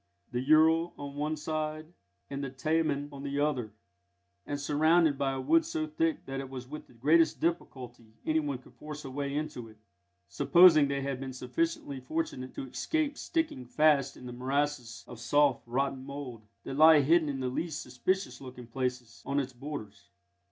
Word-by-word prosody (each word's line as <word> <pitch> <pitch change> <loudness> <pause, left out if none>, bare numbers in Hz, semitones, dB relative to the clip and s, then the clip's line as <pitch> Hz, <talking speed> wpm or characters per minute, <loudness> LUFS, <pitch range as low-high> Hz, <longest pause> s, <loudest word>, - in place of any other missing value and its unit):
_, - - -37
the 125 0 -1
Ural 160 +4 +4
on 140 -1 -7
one 150 +2 -1
side 155 +1 -4 0.3
and 140 0 -5
the 135 - -3
Taman 145 +1 0
on 140 -1 -9
the 140 0 -3
other, 135 -7 0 0.8
and 145 0 -3
surrounded 155 +2 +3
by 135 0 0
a 135 - -3
wood 325 - +4
so 325 -1 -2
thick 320 0 -1
that 135 0 -4
it 135 -1 -6
was 130 -1 -7
with 150 +3 -8
the - - -20
greatest 155 +6 +3
difficulty 125 -9 -4
anyone 150 -4 0
could 125 - -19
force 150 -1 -9
a 135 - -6
way 140 +1 -3
into 150 -6 -4
it, 110 -1 -16 0.5
supposing 155 - +6
they 140 0 -1
had 135 -1 -3
been 135 -1 -5
sufficiently 135 +2 -2
fortunate 130 -2 -4
to 135 - -5
escape 300 - -1
sticking 320 - -2
fast 140 +1 +2
in 125 - -11
the 125 - -7
morasses 130 -2 -2
of 120 - -10
soft, 140 +2 +3
rotten 135 +2 -1
mould, 135 -6 -8 0.2
that - - -5
lie 155 -1 +8
hidden 155 +2 +3
in 135 -1 -3
the 130 - -1
least 155 +4 -3
suspicious 125 +1 -2
looking 125 -2 -9
places, 125 -1 -4
on 140 +1 0
its 135 -2 -3
borders. 110 -7 -8
140 Hz, 180 wpm, -30 LUFS, 130-155 Hz, 0.8 s, lie